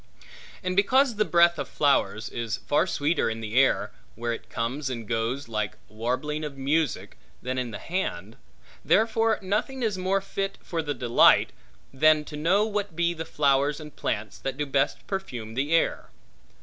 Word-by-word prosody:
And 185 0 -1
because 255 +6 +4
the 215 - +3
breath 170 -1 +4
of - - -3
flowers 140 -6 +1
is 115 -1 -3
far 150 +7 +1
sweeter 155 -4 +1
in 110 0 -4
the 110 -1 -6
air 135 +2 +3 0.2
(where 120 +1 -2
it - - -9
comes 130 +5 -2
and 115 -4 -5
goes 115 +5 -2
like 105 -2 -2
the - - -24
warbling 130 +7 -2
of 145 -2 -6
music) 145 +2 -1 0.2
than 130 +1 -2
in 125 -1 -3
the 105 - -6
hand, 110 - -4 0.5
therefore 225 0 +3
nothing 240 +7 -1
is 210 -4 -1
more 190 +2 +1
fit 195 0 -4
for 170 -3 -2
that 145 -4 -4
delight, 120 -1 +5 0.4
than 155 +2 +4
to 150 - -8
know 180 +8 +2
what 205 -5 -3
be 170 +1 +1
the 160 -1 -6
flowers 140 0 +2
and 150 -2 -10
plants 105 0 -3
that 135 -1 -4
do 150 - -1
best 135 -1 0
perfume 125 - -5
the 135 +5 -1
air. 165 - +1
150 Hz, 175 wpm, -26 LUFS, 120-185 Hz, 0.5 s, delight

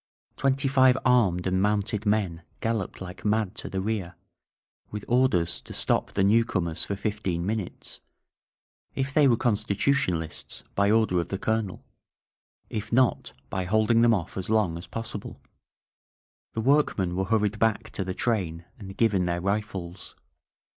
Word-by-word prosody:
Twenty 135 0 +1
five 130 -1 +5
armed 105 -9 +3
and 95 0 +1
mounted 105 +1 0
men 100 -6 0 0.2
galloped 110 -5 -2
like 90 -1 -8
mad 105 -2 +1
to - - -6
the 95 - -3
rear, 95 -4 -3 0.7
with 105 -1 -6
or 130 +2 +4
ders 85 -3 +2
to - - -11
stop - - 0
the 100 - +2
newcomers 95 -6 +2
for 100 - -3
fifteen 95 -5 -2
minutes, 105 -2 -4 0.5
— - - -34
^if 135 0 -1
they 145 -1 +5
were 120 -3 +4
Constitutionalists, 105 - -1
by 100 0 +2
order 110 -5 +3
of 85 - -2
the 95 - -3
Colonel; 110 -2 -2 0.8
if 105 0 -5
not, 125 +1 +2 0.2
by 95 -2 -2
holding 110 +4 +3
them 115 -1 +5
off 90 -2 -5
as 95 +1 -4
long 105 -7 +2
as 85 - -8
possible. 115 -2 -6 1.1
The 110 - -2
workmen 110 -9 +2
were 95 +1 0
hurried 105 0 +1
back 110 -2 +1
to 95 - -3
the 95 0 -4
train 90 -8 -1
and 95 -2 -9
given 100 -6 +2
their 85 0 -1
rifles. 100 -3 -4
105 Hz, 155 wpm, -26 LUFS, 95-115 Hz, 1.1 s, five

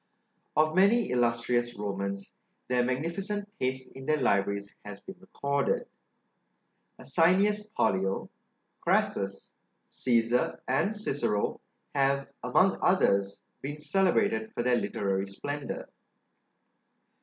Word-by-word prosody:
Of 155 0 +4
many 200 - +4
illustrious 120 -1 +1
Romans, 100 -1 -4 0.4
their 125 -1 +2
magnificent 170 - -2
taste 130 0 -2
in 135 0 -9
their 155 - +3
libraries 100 -5 0
has 105 -1 -8
been 190 0 -11
recorded. 140 -4 -1 1.1
Asinius 195 +8 +2
Pollio, 95 - 0 0.5
Crassus, 100 0 -1 0.3
Cæsar, 120 0 +1
and 195 +11 +1
Cicero, 120 - -1 0.3
have, 140 0 +2
among - - +3
others, 100 0 +2 0.2
been 145 +2 -5
celebrated 150 - +1
for 120 - -2
their 125 0 +3
literary 100 -3 -1
splendor. 145 +8 -5
125 Hz, 100 wpm, -29 LUFS, 105-155 Hz, 1.1 s, Of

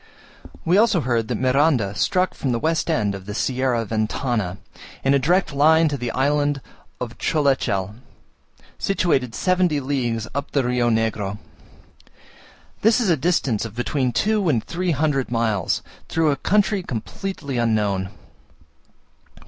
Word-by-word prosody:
We 180 +5 +4
also 210 -6 +3
heard 120 -4 0
that - - -2
Miranda 130 -5 +2
struck 185 - +1
from 135 - -2
the 120 - +1
west 160 +3 0
end 105 -3 +1
of 95 0 -8
the 105 - -5
Sierra 125 -2 0
Ventana, 110 -2 -1 0.5
in 135 - +3
a 140 - +4
direct 175 +4 +1
line 160 +3 +5
to 145 - -2
the 125 -3 -3
island 145 +2 +1 0.4
of 120 -2 -6
Cholechel, 130 - 0 0.9
situated 135 -11 0
seventy 180 -5 +2
leagues 120 -5 -2
up 140 - -3
the 140 - +2
Rio 125 -1 +1
Negro. 110 -3 -1 1.4
This 225 +3 +4
is 215 -7 +2
a - - +4
distance 145 - 0
of 115 -2 -7
between 125 +1 0
two 210 - +1
and 120 -7 +1
three 180 +1 -3
hundred 145 -3 0
miles, 115 -6 0 0.3
through 160 -2 +2
a - - +1
country 205 +4 +1
completely 140 - -5
unknown. 105 -5 0
135 Hz, 140 wpm, -22 LUFS, 115-160 Hz, 1.4 s, line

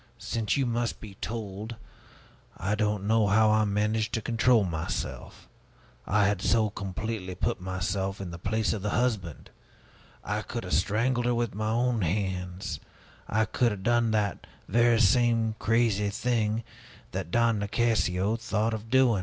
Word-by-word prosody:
since 115 +1 -1
you 135 - +2
must 120 0 -1
be 105 -3 -10
told 110 0 -5 0.8
I 95 +4 -1
don't 105 -2 0
know 110 0 +3
how 110 +2 +4
I 110 0 +3
managed 105 +2 0
to 115 - -1
control 115 -1 +3
myself 85 -3 -4 0.6
I 105 +1 +3
had 100 -1 +1
so 110 -1 +2
completely 100 -1 -4
put - - -1
myself 95 +1 -2
in 95 -3 -5
the 85 - -8
place 110 +4 0
of 105 - -4
the 105 - -1
husband! 105 -10 -2 0.7
I - - -2
could - - -5
have - - -4
strangled 120 +7 +1
her 120 - +2
with 120 -1 -1
my 110 +2 -2
own 120 0 +1
hands! 90 0 -2 0.5
I 110 +1 +2
could 120 +2 +1
have 100 -2 -6
done 120 0 +3
that 105 -2 -1 0.2
very 120 +2 +4
same 115 0 +3
crazy 110 -2 +2
thing 110 0 0 0.5
that 95 -2 -4
Don 115 +1 +2
Nicasio 100 -1 +1
thought 110 0 -1
of 110 +1 -6
doing!" 125 -4 +4
110 Hz, 155 wpm, -28 LUFS, 100-115 Hz, 0.8 s, how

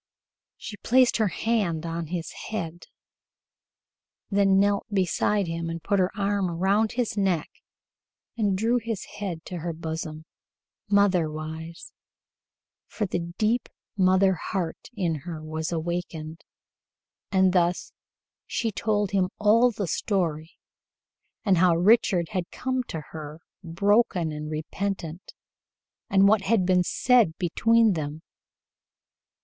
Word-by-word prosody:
She 210 - -8
placed 250 +4 +3
her 220 -2 +2
hand 190 -5 -1
on 165 0 -4
his 170 0 -4 0.2
head, 175 -5 -5 1.4
then 195 -1 +4
knelt 200 0 +2
beside 200 +1 +1
him 165 0 -3
and 165 0 -5
put 200 - +1
her 185 0 +3
arm 200 -2 0
about 195 +6 +1
his 245 -4 -1
neck 190 -6 0 0.8
and 205 -4 +1
drew 230 +4 +2
his 225 -3 -4
head 180 -6 -4
to 180 - -6
her 170 +1 -3
bosom, 160 -1 -5 0.6
motherwise, 165 -5 0 1.0
for 215 - -3
the 170 -2 -3
deep 225 +2 +1 0.3
mother 190 0 +4
heart 175 -1 -4
in 180 -6 0
her 165 -1 -6
was 160 +1 -4
awakened, 165 -1 -4 0.9
and 190 -1 +4
thus 175 -1 +1 0.5
she 225 -2 -1
told 205 0 0
him 190 -2 +1
all 225 +4 +5
the 205 -4 -3
story, 165 -4 -2 0.9
and 190 -5 +4
how 175 -1 +5
Richard 180 -2 +3
had 180 -2 -3
come 260 0 -2
to 160 - -5
her, 155 0 -8 0.2
broken 190 -1 +2
and 150 0 -5
repentant, 170 +2 -4 0.8
and 195 0 +5
what 215 0 +4
had 195 -1 +2
been 180 0 +4
said 230 -4 +3
between 225 +5 +3
them. 155 -1 -5
185 Hz, 120 wpm, -26 LUFS, 165-205 Hz, 1.4 s, all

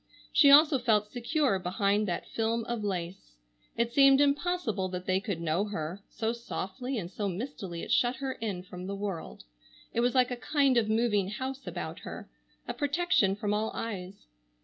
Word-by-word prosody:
She 285 - +7
also 295 0 +7
felt 210 -4 +2
secure 250 - 0
behind 200 +3 +1
that 175 -2 -3
film 225 +1 -1
of 235 -2 -3
lace. 175 - -4 0.4
It 235 0 0
seemed 275 -1 +6
impossible 285 - +1
that 180 0 -5
they 185 0 +2
could 200 -4 -4
know 170 +4 0
her, 185 -2 -5
so 225 0 -2
softly 240 +2 -4
and 175 -4 -5
so 205 -1 -2
mistily 190 -4 -5
it - - -5
shut 240 +2 +3
her 270 0 -3
in 205 -7 -4
from 180 0 -8
the 200 - -3
world. 195 -4 -5 0.5
It - - 0
was 245 +2 +2
like 255 -1 +4
a - - -1
kind 275 +1 +2
of 225 -3 +2
moving 215 -4 +2
house 265 +5 -5
about - - -5
her, - - -8 0.4
a - - -2
protection 290 - +2
from 205 0 -1
all 215 +1 0
eyes. 195 -3 -6
220 Hz, 180 wpm, -29 LUFS, 190-255 Hz, 0.5 s, She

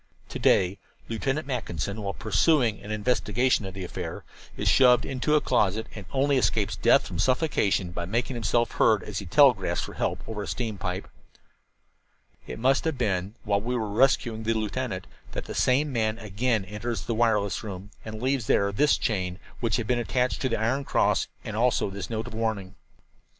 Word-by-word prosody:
"To - - -5
day 95 +2 +3 0.3
Lieutenant 135 +6 -1
Mackinson, 110 - -3
while 100 -1 -3
pursuing 115 - +2
an 100 - -11
investigation 120 +1 +1
of 95 - -8
the 95 - -5
affair, 90 - -6 0.3
is - - -2
shoved 125 -2 +5
into 135 +3 0
a 150 - +4
closet 110 -3 +1
and 100 -4 -9
only 140 +1 +2
escapes - - +1
death - - +4
from 85 -2 -6
suffocation 110 - +1
by 85 0 -4
making 120 +6 -1
himself 120 +1 +1
heard - - +3
as - - -4
he - - -7
telegraphs - - +4
for - - -7
help - - -2
over 110 -2 -4
a 100 - -5
steam 110 -5 -3
pipe. - - -3 1.4
"It 60 - -6
must 135 +3 +2
have 160 -4 -1
been 100 -3 -1
while 100 -2 +1
we 125 +3 -2
were 110 -3 -2
rescuing 115 -1 +2
the 115 +1 0
lieutenant 110 -2 -3 0.3
that - - -4
the - - -6
same 135 +3 +2
man 110 -2 0
again 110 0 -1
enters 105 +4 -4
the 115 - -2
wireless 110 -3 +1
room 100 -1 -7
and 110 -1 -7
leaves 130 -3 0
there 100 0 +3
this 145 +9 +3
chain, 90 -4 -1 0.2
which 115 -3 0
had 115 - -1
been 120 +2 +1
attached 125 +1 0
to 130 - +1
the 115 - -1
iron 125 +6 0
cross, - - +1 0.2
and 110 - -5
also 115 -3 +1
this 100 0 -6
note 110 -1 -3
of 120 - -9
warning. 110 -4 -2
110 Hz, 185 wpm, -26 LUFS, 100-125 Hz, 1.4 s, shoved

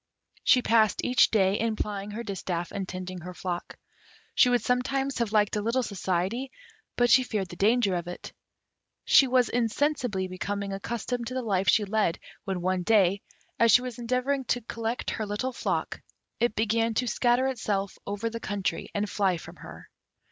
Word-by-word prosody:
She 250 -2 +5
passed 220 -3 +3
each 250 - +4
day 195 -2 +2
in 225 -1 0
plying 205 -1 -4
her 220 +3 -5
distaff 180 -4 -4
and 195 -2 -4
tending 185 0 -6
her 180 +1 -9
flock. 175 -1 -5 0.6
She 250 - +5
would 245 -1 +2
sometimes 270 +2 0
have 230 -3 0
liked 210 -1 +2
a 210 - 0
little 235 +4 0
society, 195 +5 -2 0.5
but 245 0 +3
she 260 - +7
feared 210 -7 -3
the 175 - -8
danger 210 +1 +3
of 175 -1 -3
it. 175 - -8 0.7
She 270 - +6
was 250 -1 +3
insensibly 245 -4 0
becoming 200 +2 -4
accustomed 235 +4 -3
to 255 - -5
the 255 - -2
life 195 -4 0
she 210 - +4
led, 205 -4 +1 0.3
when 190 -3 -2
one 185 +1 0
day, 200 -1 +3 0.4
as 230 -1 +5
she 245 - +6
was 250 -2 -6
endeavouring 255 +3 -1
to 245 +1 0
collect 230 +1 -3
her 220 - -3
little 230 +6 -2
flock, - - -2 0.4
it 240 -2 +1
began 225 +1 +1
to 250 - +1
scatter 245 +2 +2
itself 210 -7 -2
over 205 +3 -2
the 230 0 -4
country 205 -3 -3
and 205 +1 0
fly 195 -3 +1
from - - -11
her. - - -11
215 Hz, 180 wpm, -27 LUFS, 195-245 Hz, 0.7 s, she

